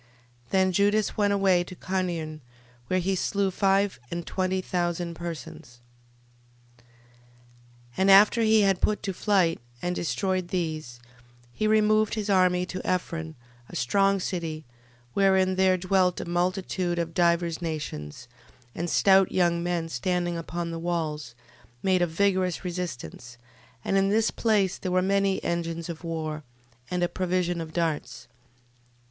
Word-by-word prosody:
12:26. - - -31
Then 190 -1 +3
Judas 205 +3 +2
went 205 -1 +2
away 195 -3 +3
to 185 - -10
Carnion, 175 -5 -3 0.5
where 185 - +1
he 190 +2 0
slew 195 +1 0
five 195 - +1
and 170 -1 -4
twenty 185 0 -1
thousand 175 -2 -2
persons. 165 -7 -8 1.0
12:27. - - -26 1.1
And 190 +1 +3
after 205 +4 +7
he 220 -1 +5
had 195 -2 +2
put 210 - +1
to 195 - -2
flight 185 -4 +2 0.2
and 180 +4 -2
destroyed 185 +1 -1
these, 155 -9 -3 0.5
he 215 - 0
removed 215 0 +3
his 210 -2 -2
army 180 -1 +3
to 185 0 -6
Ephron, 165 -3 -2 0.3
a - - -10
strong 195 +10 +2
city, 165 -4 -4 0.5
wherein 190 -1 +3
there 190 0 +3
dwelt 185 0 +1
a - - -4
multitude 175 0 -1
of 165 -1 -2
divers 170 -1 +1
nations: 125 - -5 0.5
and 170 +1 -3
stout 195 +1 +4
young 170 -2 +2
men 175 -1 -1
standing 175 +5 -1
upon 170 0 -4
the 165 - -5
walls, 155 -7 -3 0.5
made 185 -1 +2
a 175 - +3
vigorous 185 +1 0
resistance: 125 - -6 0.5
and 195 - +1
in 195 0 +2
this 220 +2 +2
place 205 -5 +1
there 185 - -3
were 185 - +3
many 195 0 +1
engines 170 -1 -3
of 170 0 -7
war, 160 -2 -4 0.5
and 180 -1 -1
a - - +3
provision 180 -1 -1
of 160 -1 -7
darts. 155 -7 -3
180 Hz, 145 wpm, -26 LUFS, 165-195 Hz, 1.1 s, after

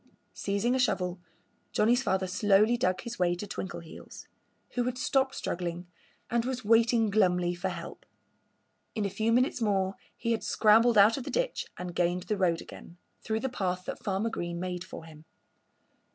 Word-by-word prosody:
Seizing 200 +5 0
a 260 - +1
shovel, 180 -7 0 0.5
Johnnie's 240 +4 +3
father 190 -4 0
slowly 205 +4 +3
dug 185 -6 0
his 235 -3 -7
way 175 -1 +2
to 180 - -6
Twinkleheels, 180 -4 -8 0.5
who 245 -1 0
had 250 0 -2
stopped 265 0 +1
struggling 175 0 -4 0.4
and 235 0 0
was 255 -2 -4
waiting 230 0 +4
glumly 180 -4 +2
for 180 +2 -3
help. 180 - -8 0.9
In 215 -2 -1
a 200 - -2
few 220 +4 0
minutes 250 +1 +2
more 195 -3 +1 0.2
he 230 - -2
had 225 - 0
scrambled 225 +2 +4
out 210 +4 +6
of 270 - -4
the - - -6
ditch - - -1
and 180 -1 -6
gained 175 +1 0
the 210 - -1
road 170 -3 +2
again, 170 - -12 0.3
through 220 0 -1
the 265 - -1
path 185 -7 -2
that - - -6
Farmer 200 +3 -1
Green 175 -3 -4
made 180 -1 -4
for 170 -3 -10
him. 155 -1 -14
200 Hz, 175 wpm, -29 LUFS, 180-230 Hz, 0.9 s, out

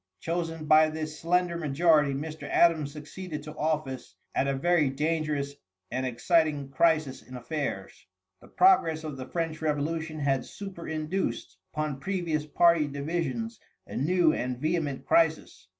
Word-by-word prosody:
Chosen 165 -2 -3
by 155 +1 +6
this 155 -1 -5
slender 175 +1 +1
majority, 150 -1 +3
Mr. 155 +2 -6
Adams 160 -4 +3
succeeded 150 +1 -7
to 150 0 -9
office 150 -4 -2 0.2
at 135 - +1
a 140 - 0
very 155 0 +2
dangerous 150 0 -1 0.4
and 130 +2 -1
exciting 145 +2 +1
crisis 155 -1 +2
in 130 - -12
affairs. 140 +4 -5 0.3
The - - -15
progress 165 - +4
of 155 -3 -5
the 130 -1 -7
French 165 -2 -3
revolution 155 +1 -1
had 135 -2 +1
superinduced 165 - -4 0.2
upon 155 -3 -3
previous 165 -4 -2
party 170 -1 +4
divisions 170 +11 -3 0.3
a - - -9
new 165 +3 +3
and 125 0 -2
vehement 155 -1 -1
crisis. 160 - +1
155 Hz, 135 wpm, -28 LUFS, 145-165 Hz, 0.4 s, by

